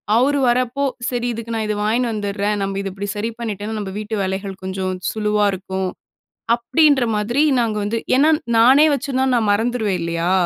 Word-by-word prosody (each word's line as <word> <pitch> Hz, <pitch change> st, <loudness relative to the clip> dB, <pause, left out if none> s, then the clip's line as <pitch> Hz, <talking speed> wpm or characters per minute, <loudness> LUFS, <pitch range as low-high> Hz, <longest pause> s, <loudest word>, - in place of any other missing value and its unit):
அவர் 280 Hz, +4 st, +3 dB
வரப்போ, 250 Hz, +3 st, +1 dB, 0.3 s
"சரி, 245 Hz, -1 st, -2 dB
இதுக்கு 230 Hz, 0 st, -6 dB
நான் 220 Hz, -1 st, -1 dB
இதை 210 Hz, -, -1 dB
வாங்கினு 230 Hz, +3 st, +1 dB
வந்துர்றேன். 205 Hz, 0 st, -1 dB
நம்ப 195 Hz, 0 st, -2 dB
இத 195 Hz, -, -4 dB
இப்டி 200 Hz, +1 st, -5 dB
சரி 215 Hz, +2 st, -2 dB
பண்ணிட்டோன்னா 215 Hz, -1 st, -4 dB
நம்ம 200 Hz, -2 st, -5 dB
வீட்டு 215 Hz, +1 st, -4 dB
வேலைகள் 190 Hz, +1 st, -3 dB
கொஞ்சம் 185 Hz, 0 st, -3 dB, 0.2 s
சுலுவா 210 Hz, -1 st, +1 dB
இருக்கும்" 190 Hz, 0 st, -3 dB, 0.7 s
அப்படின்ற 285 Hz, +2 st, +3 dB
மாதிரி 235 Hz, +7 st, +1 dB, 0.2 s
நாங்க 225 Hz, -2 st, 0 dB
வந்து 225 Hz, +3 st, -1 dB, 0.2 s
ஏன்னா 295 Hz, +4 st, +5 dB, 0.3 s
நானே 265 Hz, +6 st, +6 dB
வச்சிருந்தா 265 Hz, -1 st, -1 dB
நான் 220 Hz, -3 st, +1 dB
மறந்துருவேன் 220 Hz, -2 st, 0 dB
இல்லையா, 170 Hz, +1 st, -1 dB
215 Hz, 165 wpm, -20 LUFS, 200-240 Hz, 0.7 s, நானே